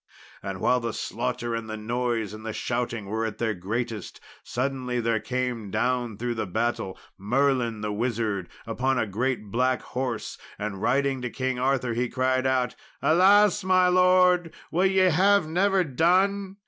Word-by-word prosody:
And - - -5
while 125 - +3
the 115 -2 -3
slaughter 120 0 -3
and 115 -1 -4
the 110 - -4
noise 115 -1 -2
and 110 0 -9
shouting 120 -3 -2
were 110 +3 -2
at 110 -1 -3
their 115 -1 0
greatest, 110 +4 -4 0.2
suddenly 125 0 -2
there 115 -1 +1
came 125 -3 -3
down 120 +1 -1
through 120 +1 -2
the 110 -3 -3
battle 110 -1 -2 0.2
Merlin 120 0 +1
the 105 -1 -2
Wizard, 110 -4 -2 0.2
upon 130 +3 0
a 110 - +1
great 110 0 -2
black 125 +2 +1
horse, 125 -3 -4 0.2
and 100 -2 -5
riding 135 +3 +1
to 125 - -3
King 130 0 -2
Arthur, 130 -2 +1
he 120 +1 -1
cried 130 0 +1
out, 130 -2 +1 0.3
"Alas, 200 +4 +5
my 185 -1 +4
Lord! 180 -1 +4 0.2
will 180 +3 +3
ye 190 0 +2
have 195 +1 +4
never 190 +3 +2
done? 190 +6 +1
125 Hz, 160 wpm, -26 LUFS, 115-140 Hz, 0.3 s, Alas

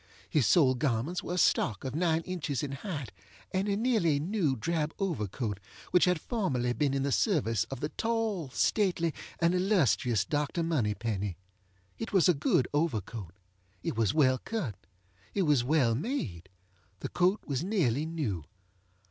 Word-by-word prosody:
His 140 -8 +2
sole 140 -7 +5
garments 130 +5 -1
were 180 - -4
a - - -3
stock 110 - +2
of 130 - -4
nine 165 0 +1
inches 165 -7 -3
in 140 - -3
height, 145 - -5 0.4
and 190 +2 0
a 200 - +1
nearly 210 - +2
new 165 -4 0
drab 160 +4 -1
overcoat 115 - -2 0.3
which 180 - +5
had 180 -2 +2
formerly 135 - -1
been 140 0 0
in 135 - 0
the 140 - 0
service 115 - +2
of 115 - -7
the 150 - -1
tall, 220 - -1
stately, 170 - +1 0.3
and 170 +1 +3
illustrious 130 - +2
Dr. 150 +3 -1
Moneypenny. 105 - -1 0.6
It 225 - -5
was 190 -2 +5
a 180 - +6
good 140 -3 +2
overcoat. 110 - -2 0.5
It - - -2
was 110 -3 +2
well 130 -4 +3
cut. 195 - -3 0.6
It 200 - +2
was 145 -7 +3
well 130 -3 +3
made. 115 - -3 0.5
The - - -3
coat 185 +4 +2
was 140 -1 -2
nearly 160 - +1
new. 120 - -3
150 Hz, 155 wpm, -30 LUFS, 120-180 Hz, 0.6 s, a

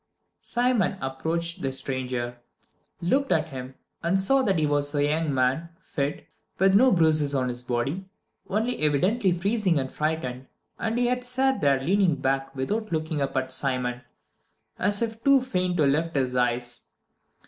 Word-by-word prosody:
II - - -52
Simon 240 -6 +1
approached 165 +6 -3
the 135 - -1
stranger, 125 -2 -3 0.6
looked 270 +11 +1
at 160 0 +2
him, 130 -1 -7 0.3
and 175 +3 +1
saw 265 +8 +4
that 195 -8 +1
he 155 - +2
was 145 0 0
a 145 - +3
young 155 +1 +1
man, 135 +5 +1
fit, 145 -5 -3 0.3
with 190 +1 +4
no 255 +6 +6
bruises 155 -5 +3
on 130 -1 +1
his 120 0 -3
body, 135 +10 -2 0.4
only 220 +5 0
evidently 185 - +2
freezing 190 0 +1
and 130 -1 -2
frightened, 145 -5 -3 0.3
and 225 +1 -1
he 245 +1 +1
sat 260 +2 +1
there 140 -2 +3
leaning 180 +3 +2
back 135 0 -1
without 210 +11 -2
looking 155 -2 -1
up 135 - -1
at 130 0 -1
Simon, 125 -2 -2 0.8
as 205 +3 +1
if 225 0 -5
too 275 0 +6
faint 185 -8 -1
to 155 - +4
lift 160 +4 +1
his 130 -2 0
eyes. 120 0 -1
155 Hz, 160 wpm, -26 LUFS, 135-195 Hz, 0.8 s, no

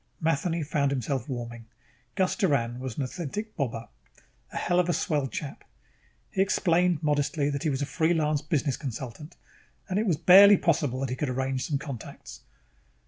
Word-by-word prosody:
Matheny 165 +1 0
found 145 -2 0
himself 135 0 -2
warming. 120 -2 -6 0.5
Gus 185 -1 +1
Doran 125 - 0
was 130 -3 -6
an 140 - -1
authentic 185 - -5
bobber. 115 -6 -3 0.6
A - - -6
hell 175 0 +1
of 180 -1 +1
a - - +3
swell 145 -5 0
chap. 140 +2 -6 0.7
He 190 - 0
explained 180 -3 +2
modestly 145 0 +1
that 140 - -3
he 160 - 0
was 140 0 -1
a - - -1
free 160 +4 +1
lance 150 -2 +1
business 145 -3 -1
consultant 135 +3 -7 0.5
and 190 +2 0
it 220 - 0
was 170 -6 +2
barely 195 +4 +8
possible 145 -7 0
that 135 -2 -2
he - - -1
could 145 +1 -2
arrange 130 0 -2
some 145 - 0
contacts.... 135 -5 -9
145 Hz, 175 wpm, -27 LUFS, 130-170 Hz, 0.7 s, barely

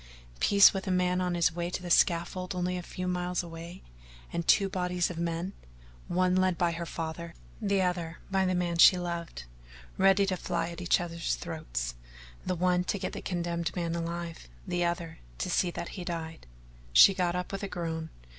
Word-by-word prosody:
Peace 200 0 +7
with 195 -1 -4
a - - 0
man 180 0 +2
on 180 -1 0
his 170 -1 +2
way 175 0 -2
to 180 0 -5
a 175 - -4
scaffold 180 +2 +2
only 180 0 -1
a 180 - -3
few 180 +1 -5
miles 180 0 -1
away, 170 +1 -9 0.5
and 170 - -2
two 200 -2 +5
bodies 180 -1 -1
of 165 - -6
men, 170 +3 -2 0.5
one 180 +1 +2
led 185 -2 +2
by 175 0 +2
her 170 0 -5
father, 165 +1 -5 0.3
the 200 -2 +2
other 175 -2 -2
by 190 0 +2
the 185 -1 +1
man 175 -1 -1
she 180 - +9
loved, 170 - -4 0.6
ready 195 +1 +5
to 190 -1 0
fly 170 -1 -2
at 170 0 -7
each 175 - +3
other's 170 - -2
throats - - -4 0.5
the 185 - -1
one 180 +1 +2
to 200 - -1
get 185 - -4
the - - -5
condemned 170 -1 -2
man 170 -2 -1
alive, 170 - -5 0.2
the 175 0 -1
other 170 -1 -2 0.2
to 60 - -2
see 180 - +2
that 170 - -5
he 185 - -7
died. 165 -2 -5 0.4
She 60 - +8
got 180 -2 0
up 180 0 -3
with 195 - -4
a 200 - -3
groan. 165 -3 -4
175 Hz, 195 wpm, -29 LUFS, 170-180 Hz, 0.6 s, she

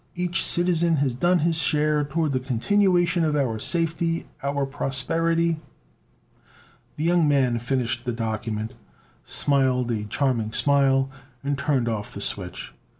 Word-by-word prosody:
Each 175 -1 +1
citizen 170 -1 +2
has 140 -3 0
done 175 +9 +2
his 165 -1 +2
share 150 0 +1
toward 150 +1 -1
the 130 - 0
continuation 175 - +2
of 155 -2 +1
our 125 -6 0
safety, 165 +2 0 0.2
our 140 0 -1
prosperity...." 165 +5 -1 1.4
The 150 - -4
young 170 -1 +3
man 130 -5 +2
finished 120 -1 -2
the 125 - -1
document, 110 -1 -3 0.5
smiled 130 -3 +2
a 105 -2 -2
charming 115 -1 -1
smile, 135 -1 +3 0.3
and 140 +1 -1
turned 135 -3 0
off 110 -3 -4
the - - -6
switch. - - -4
140 Hz, 135 wpm, -24 LUFS, 125-165 Hz, 1.4 s, young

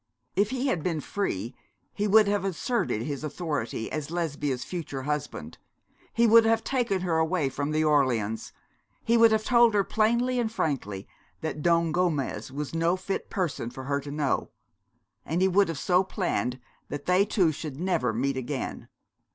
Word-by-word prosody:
If 200 +2 +2
he 260 0 -2
had 185 - 0
been 165 -1 -1
free 125 - -3 0.4
he 205 0 -1
would 215 +1 +6
have 205 -1 +1
asserted 195 - -1
his 140 +2 -4
authority 150 -7 -3
as 155 -2 -3
Lesbia's 150 -6 -2
future 145 -7 -5
husband; 135 - -4 0.5
he 235 +1 +3
would 230 0 +7
have 225 0 +2
taken 240 -8 0
her 170 -3 +1
away 160 -3 +1
from 145 +2 -3
the 155 +1 +1
Orleans; 125 -8 +1 0.5
he 230 - +2
would 230 -1 +6
have 220 0 +2
told 235 -2 +4
her 200 - +4
plainly 235 +5 +1
and 225 -2 0
frankly 125 - -2 0.3
that 155 -1 -3
Don 170 0 +3
Gomez 155 -7 -1
was 145 +2 -5
no 165 +2 +2
fit 195 +1 -4
person 165 -10 -2
for 130 +2 -8
her 140 +1 -1
to 145 - -8
know; 145 -1 -1 0.7
and 165 +3 -2
he 190 - +4
would 195 +2 +4
have 165 -3 -4
so 180 +6 +3
planned 175 - -2 0.3
that 145 - -5
they 180 +2 +4
two 190 -5 +2
should 150 -2 -7
never 170 -9 +1
meet 130 +4 -1
again. 130 +1 -4
165 Hz, 175 wpm, -27 LUFS, 140-200 Hz, 0.7 s, would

